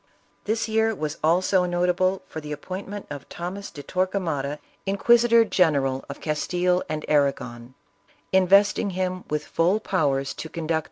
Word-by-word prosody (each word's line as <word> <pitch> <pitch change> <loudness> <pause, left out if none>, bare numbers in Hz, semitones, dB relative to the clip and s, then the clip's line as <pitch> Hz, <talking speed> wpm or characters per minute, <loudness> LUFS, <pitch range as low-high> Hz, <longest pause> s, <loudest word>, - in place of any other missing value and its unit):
This 220 +2 0
year 220 0 +1
was 155 -3 -4
also 180 +3 +3
notable 180 +2 +1
for 160 - -7
the 150 0 -8
appointment 190 +7 -6
of 145 -2 -8
Thomas 185 +4 -6
de 145 -3 -10
Torquemada 170 -7 -1 0.3
inquisitor 230 +3 +5
general 140 -9 +2
of - - -7
Castile 180 +4 0
and 155 0 -3
Arragon, 130 -4 0 0.6
investing 195 +2 +4
him 185 -1 -2
with 150 0 -2
full 180 +6 +1
powers 140 -9 0
to 160 - -7
conduct 160 -1 -1
180 Hz, 135 wpm, -24 LUFS, 150-195 Hz, 0.6 s, inquisitor